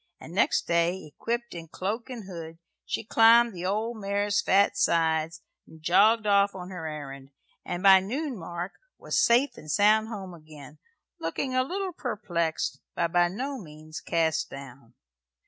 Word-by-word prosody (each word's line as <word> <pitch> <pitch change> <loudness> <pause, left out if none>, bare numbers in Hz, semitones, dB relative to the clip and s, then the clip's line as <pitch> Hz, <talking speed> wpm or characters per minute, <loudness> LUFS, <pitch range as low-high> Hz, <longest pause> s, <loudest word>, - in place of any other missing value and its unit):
And 160 - -11
next 195 - +2
day, 170 +2 0
equipped 235 +1 -3
in 165 -1 -8
cloak 210 +10 -4
and 240 -4 -7
hood, 165 -3 -8 0.3
she - - -2
climbed 230 +1 +5
the 180 0 -4
old 220 +4 -2
mare's 205 0 0
fat 200 +1 +3
sides 165 -3 +1 0.3
and 160 - -15
jogged 205 +7 +4
off 200 -1 +3
on 180 0 -8
her 170 -4 -5
errand; 140 -3 -8 0.3
and 175 +1 -5
by 195 -1 +8
noon 260 +9 -3
mark 175 0 -6 0.3
was - - -4
safe 255 - +3
and 155 - -11
sound 215 +6 +4
home 195 -5 -7
again, 155 -2 -13 0.4
looking 255 +11 -3
a 255 - +3
little 370 +7 -3
perplexed, 175 - -2 0.2
but 170 -1 0
by 175 0 +4
no 260 +9 -4
means 155 -3 -10
cast 160 -2 0
down. 135 -3 -11
190 Hz, 160 wpm, -27 LUFS, 165-220 Hz, 0.4 s, by